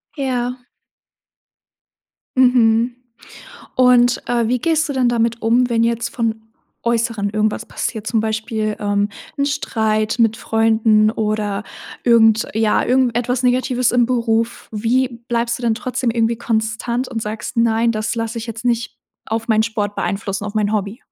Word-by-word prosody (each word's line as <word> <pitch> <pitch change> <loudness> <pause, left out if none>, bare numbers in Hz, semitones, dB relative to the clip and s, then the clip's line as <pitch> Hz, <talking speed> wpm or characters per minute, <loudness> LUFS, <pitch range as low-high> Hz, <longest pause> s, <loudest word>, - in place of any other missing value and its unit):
Ja. 250 -3 -2 1.8
Mhm. 240 -2 +4 0.8
Und, 250 -1 +4
äh, 235 -1 +1
wie 250 - +1
gehst 320 +4 +1
du - - -2
dann 260 -3 +2
damit 235 -1 0
um, 240 +2 +2
wenn 230 -1 +2
jetzt 235 0 -1
vom 225 -2 -3 0.3
Äußeren 230 -3 0
irgendwas 215 +1 -1
passiert? 220 -3 -4
Zum 225 - +1
Beispiel, 220 -1 -2
ähm, 205 0 0 0.3
'n 280 - +1
Streit 220 -6 -1
mit 225 -1 +3
Freunden 220 -1 +3
oder 210 -2 -2 0.4
irgend 225 -2 +5
ja, 220 -1 +2
irgendetwas 250 -1 +1
Negatives 250 0 +2
im 245 -1 +3
Beruf? 230 -2 -1
Wie 235 +3 0
bleibst 235 -1 0
du 245 - -11
dann 230 -2 +2
trotzdem 255 0 -2
irgendwie 230 0 +1
konstant 230 +2 -2
und 225 - -4
sagst: 215 +3 -5
„Nein, 230 0 +2
das 215 +1 -2
lasse 230 0 -3
ich 225 - -6
jetzt 230 +1 -7
nicht 235 -1 -1 0.3
auf 225 +1 -3
meinen 220 -1 +4
Sport 210 -2 -2
beeinflussen, 195 0 -3
auf 205 +1 -6
mein 210 -1 +1
Hobby?“ 205 +1 -2
230 Hz, 150 wpm, -19 LUFS, 220-245 Hz, 1.8 s, irgend